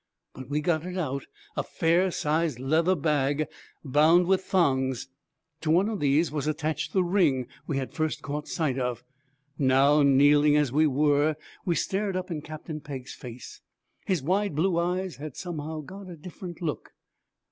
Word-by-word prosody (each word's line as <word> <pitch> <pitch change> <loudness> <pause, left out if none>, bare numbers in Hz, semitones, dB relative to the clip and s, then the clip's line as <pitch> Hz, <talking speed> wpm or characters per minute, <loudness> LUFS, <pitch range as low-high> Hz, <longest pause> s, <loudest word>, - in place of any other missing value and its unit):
but 130 0 -10
we 150 +1 0
got 155 0 +1
it 180 +1 -5
out: 140 -6 -2 0.3
a - - +1
fair 170 +3 +1
sized 155 -4 0
leather 160 +8 +2
bag 145 -1 +1 0.4
bound 155 +6 +5
with 190 +1 +2
thongs. 130 -9 +1 0.5
To 160 - -2
one 180 +5 +4
of 215 -3 -3
these 145 +2 +2
was 150 -1 -2
attached 155 0 -2
the 190 - +2
ring 170 -9 +2 0.2
we 145 - -1
had 135 -1 -4
first 155 -1 -2
caught 145 +1 -4
sight 140 -5 -1
of. 125 -2 -2 0.6
Now, 140 +2 +4
kneeling 145 +2 +5
as 145 -4 +2
we 155 +3 +4
were, 145 +2 +2 0.3
we 175 -3 +1
stared 195 +2 -1
up 185 0 -3
in 155 -3 -3
Captain 155 +1 -7
Pegg's 135 -4 -7
face. 125 -1 -10 0.5
His 185 -8 0
wide 190 +2 0
blue 170 +2 +2
eyes 180 +1 -1
had 145 -1 -7
somehow 160 -3 -5
got 190 +5 -10
a 175 - -8
different 175 +2 -9
look. 155 -3 -4
155 Hz, 170 wpm, -27 LUFS, 140-175 Hz, 0.6 s, bound